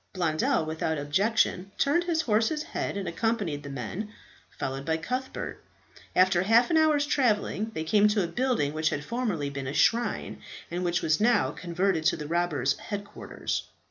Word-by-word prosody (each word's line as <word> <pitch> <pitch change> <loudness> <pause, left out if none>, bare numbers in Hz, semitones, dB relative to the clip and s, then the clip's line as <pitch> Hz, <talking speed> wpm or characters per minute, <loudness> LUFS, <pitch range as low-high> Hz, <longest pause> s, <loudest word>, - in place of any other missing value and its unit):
Blondel, 160 -3 +1
without 160 0 -2
objection, 190 +5 +1
turned 340 +5 +2
his 330 -2 +1
horse's 230 +5 +1
head - - -3
and 195 -2 -3
accompanied 190 -5 -1
the 145 - -8
men, 140 - -5 0.4
followed 135 +1 -4
by 160 +2 0
Cuthbert. 255 +11 -4 0.5
After 185 -1 +4
half 225 - +4
an 325 - +4
hour's 305 -2 +4
travelling, 220 -6 +1
they 160 - -2
came 205 +6 +4
to 210 -2 +2
a - - -1
building 235 - 0
which 155 0 +1
had 145 0 -3
formerly 210 - -2
been 140 -1 -5
a 140 - -3
shrine, 235 +9 +1 0.3
but 175 +1 -2
which 175 -1 0
was 155 +4 +2
now 220 - +3
converted 175 +1 -1
to - - +3
the 150 - -6
robbers' 160 -6 0
headquarters. 205 -1 -5
185 Hz, 170 wpm, -27 LUFS, 155-230 Hz, 0.5 s, After